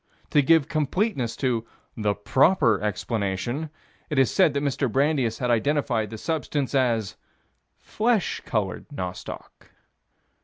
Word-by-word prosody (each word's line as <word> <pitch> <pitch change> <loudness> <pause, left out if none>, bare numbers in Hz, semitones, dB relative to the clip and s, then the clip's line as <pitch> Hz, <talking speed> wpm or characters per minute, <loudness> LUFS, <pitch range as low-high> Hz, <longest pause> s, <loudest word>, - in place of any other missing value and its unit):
To 145 - +5
give 160 0 +4
completeness 155 - -1
to 125 -4 0 0.3
"the 105 -2 0
proper 115 - +3
explanation," 105 - -2 0.4
it 150 - -2
is 135 -3 +4
said 175 -7 +3
that 140 - 0
Mr. 140 -3 0
Brandeis 135 -4 +1
had 125 -1 0
identified 120 -3 +1
the 110 - -7
substance 150 -1 -2
as 120 -6 +1 0.6
"flesh 220 -3 0
colored" 105 -5 -2
nostoc. 90 -11 -7
130 Hz, 120 wpm, -25 LUFS, 110-150 Hz, 0.6 s, To